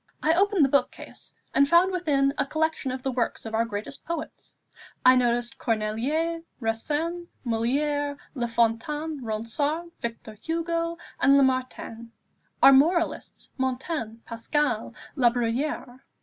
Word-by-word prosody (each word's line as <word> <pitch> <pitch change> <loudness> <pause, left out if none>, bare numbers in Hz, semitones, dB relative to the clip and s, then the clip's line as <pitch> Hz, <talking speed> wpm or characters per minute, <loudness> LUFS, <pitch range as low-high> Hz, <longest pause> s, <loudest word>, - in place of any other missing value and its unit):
I 320 - +4
opened 390 -3 +4
the - - 0
book 280 +1 +3
case, - - -9 0.2
and 280 +1 +4
found 345 +4 +5
within 290 -7 +1
a - - 0
collection 315 -2 -1
of 255 0 -5
the 270 - 0
works 245 -2 -2
of 225 - -6
our 225 +1 +2
greatest 215 +4 -6
poets. 335 -2 -6 0.5
I 255 0 +8
noticed 240 +1 0
Corneille, 255 +10 -1 0.2
Racine, 300 +10 -2 0.2
Molière, 285 +5 0 0.2
La 245 -4 -2
Fontaine, 245 +6 0
Ronsard, 285 +10 -2
Victor 230 -1 -5
Hugo, 335 0 -1 0.2
and 275 0 +6
Lamartine. 255 -3 0 0.5
Our 275 - +10
moralists 335 +5 +1
Montaigne, 260 -2 -2
Pascal, 235 0 -1 0.2
Labruyère. 245 +1 0
270 Hz, 125 wpm, -26 LUFS, 235-315 Hz, 0.5 s, Our